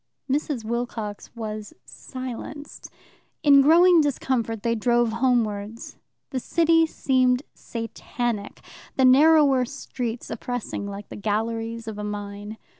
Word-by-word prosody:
Mrs. 275 -3 -1
Wilcox 225 -3 -4
was 215 -2 -6
silenced. 260 +3 -8 0.5
In 280 -2 +7
growing 340 +4 +6
discomfort 245 -6 -1
they 230 - +1
drove 240 +1 +2
homewards. 230 -3 -1 0.3
The 260 - -1
city 330 +4 +3
seemed 255 -3 +2
Satanic, 230 -1 -4 0.3
the 265 - +4
narrower 280 0 +6
streets 245 -2 -5
oppressing 230 -3 -4
like 200 0 -8
the - - -8
galleries 225 +2 -2
of 215 -1 -5
a - - -4
mine. 205 +1 -6
240 Hz, 115 wpm, -24 LUFS, 220-270 Hz, 0.5 s, In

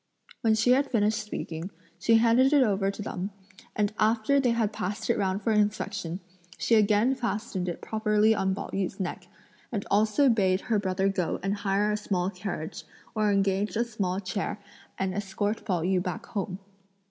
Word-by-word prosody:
When 220 -1 +3
she 225 +3 +3
had 275 +2 +3
finished 215 -2 +2
speaking, 170 -4 -5 0.3
she 225 +5 +4
handed 235 +5 +5
it 285 -3 +6
over 195 -4 +1
to 200 +1 -5
them, 185 0 -4 0.5
and 210 -1 +1
after 220 +5 +3
they 260 -3 +2
had 230 -2 +1
passed 205 +4 -2
it - - +1
round 195 +1 -1
for 225 - +1
inspection, 205 -4 0 0.4
she - - 0
again 215 +3 +4
fastened 210 -7 -2
it 170 - -5
properly 215 0 +2
on 190 -3 0
Pao - - -6
yü's 195 0 -2
neck, 185 -2 -4 0.4
and 210 -4 -3
also 215 +7 +4
bade 195 -6 +3
her 220 -3 0
brother 190 0 0
go 185 -4 -1
and 195 +1 0
hire 200 +1 +1
a 210 - 0
small 190 -3 -1
carriage, 180 -4 -5 0.3
or 215 -1 +2
engage 195 +1 +1
a 235 +2 +1
small 195 -5 -2
chair, 200 +2 -3 0.4
and 190 -1 -1
escort 205 +2 -2
Pao 180 -6 0
yü 185 0 +2
back 180 -2 -4
home. 190 -2 -4
205 Hz, 180 wpm, -27 LUFS, 190-220 Hz, 0.5 s, it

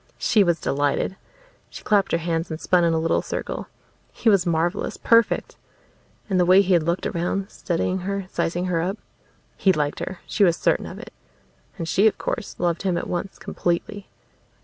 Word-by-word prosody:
She 220 -4 +3
was 170 -3 +1
delighted. 145 +6 0 0.5
She - - -10
clapped 200 -2 +2
her - - +3
hands 165 0 -2
and 160 -1 -5
spun 180 0 +2
in 170 - +3
a - - +1
little 165 +1 +1
circle. - - -5 0.4
He 230 - +1
was 195 -4 +3
marvelous, 170 +3 0
perfect! 230 -1 +2 0.7
And 190 -3 +1
the 180 - +4
way 185 +3 +6
he 190 0 +2
had 170 - +4
looked 170 +3 -1
around, 190 +4 -2
studying 180 +2 -1
her, 195 +1 -3
sizing 175 +2 -1
her 175 -3 0
up. 190 +5 -2 0.6
He 195 - +4
liked 150 -4 -1
her; 185 - -6
she 205 - +1
was 170 -3 +4
certain - - +1
of - - -8
it. - - -11 0.6
And 165 - -4
she, 195 +6 +4
of 220 - +1
course, 235 - -4
loved 175 -1 0
him 185 -3 0
at - - -3
once, 180 +2 -4
completely. 190 +4 -3
180 Hz, 190 wpm, -23 LUFS, 170-195 Hz, 0.7 s, way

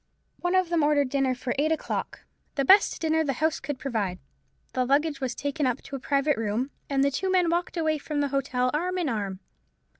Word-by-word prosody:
One 355 +1 0
of 370 -2 +3
them 340 -2 +2
ordered 290 -2 +3
dinner 270 -1 +1
for 245 0 -3
eight 310 +2 +2
o'clock, 320 - -3 0.3
the 275 - +1
best 395 +8 +5
dinner 320 0 +2
the 280 -3 0
house 315 +4 0
could 275 0 -4
provide. 215 -10 -2 0.6
The 255 - +1
luggage 280 +2 +1
was 255 -2 -2
taken 285 0 -1
up 250 - -2
to 280 - -7
a - - -4
private 280 +2 +1
room, 225 +5 -1 0.2
and 275 -1 +2
the 280 - +2
two 375 +8 -1
men 360 -3 +3
walked 345 +1 -1
away 315 -2 +1
from 295 0 -3
the 285 -1 +1
hotel 255 -2 0
arm 360 +5 -1
in 350 -4 0
arm. 200 -4 -3
280 Hz, 215 wpm, -27 LUFS, 255-315 Hz, 0.6 s, best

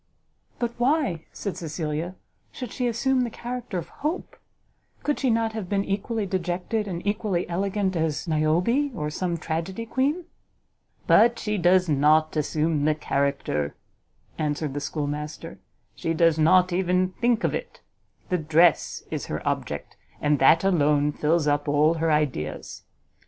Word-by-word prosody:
"But 240 -1 -1
why," 245 - +1
said 200 - -5
Cecilia, 160 +1 -3 0.4
"should 250 -4 -7
she 250 - -1
assume 255 +3 +1
the 245 - 0
character 240 -3 -5
of 170 -1 -5
Hope? 315 +5 -3 0.7
Could 295 - 0
she 265 - +1
not 225 -1 +1
have 215 -5 -5
been 200 -1 0
equally 210 +2 -2
dejected 185 +3 -2
and 175 -1 -5
equally 205 -3 -1
elegant 190 +2 -1
as 160 0 -1
Niobe, 175 - +1
or 150 -3 -3
some 175 +1 -2
tragedy 170 +7 -3
queen?" 285 +9 0 0.8
"But 235 +1 +5
she 210 0 -2
does 180 +1 +4
not 155 +2 +3
assume 155 0 0
the 155 0 +3
character," 140 - -1 0.6
answered 150 -1 -1
the 145 - -3
schoolmaster, 150 +2 -4 0.4
"she 165 +6 -2
does 165 -1 +3
not 180 +3 +5
even 180 0 +2
think 235 -1 +2
of - - +1
it: - - -6 0.5
the 180 - +1
dress 160 +1 +3
is - - -3
her - - -4
object, - - -3 0.2
and 145 -1 +2
that 160 +6 +5
alone 150 -5 +3
fills 155 +2 +1
up 145 0 +1
all 150 +2 +4
her 165 -1 0
ideas. 130 - -2
175 Hz, 145 wpm, -25 LUFS, 155-210 Hz, 0.8 s, But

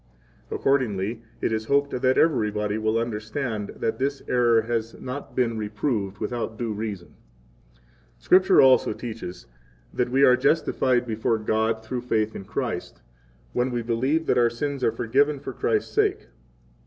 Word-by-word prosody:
Accordingly 115 -5 0 0.2
it - - 0
is 110 0 -1
hoped 140 +2 +2
that 130 0 +3
everybody 105 -8 +1
will 110 +1 +1
understand 110 0 -3
that 115 - -2
this 140 +1 -2
error 120 -2 +3
has 115 0 -3
not 130 +3 -7
been 115 -3 0
reproved 105 -2 -2
without 110 0 -4
due 115 -2 -2
reason.] 105 -4 -5 0.7
28 - - -33 0.3
Scripture 185 - +5
also 130 -1 +5
teaches 110 -6 -7 0.5
that 125 - 0
we 135 +2 +3
are 125 -2 +7
justified 130 -3 +1
before 115 0 0
God 110 +1 0
through 125 +1 -3
faith 110 -3 -1
in 95 - -7
Christ, - - -4 0.5
when 125 +1 +1
we 120 -2 -2
believe 130 +8 0
that - - +2
our 120 -1 +4
sins 140 +3 -4
are 115 - +3
forgiven 135 +6 +1
for 135 - -7
Christ's 110 -2 -1
sake. - - +1
115 Hz, 155 wpm, -25 LUFS, 110-130 Hz, 0.7 s, are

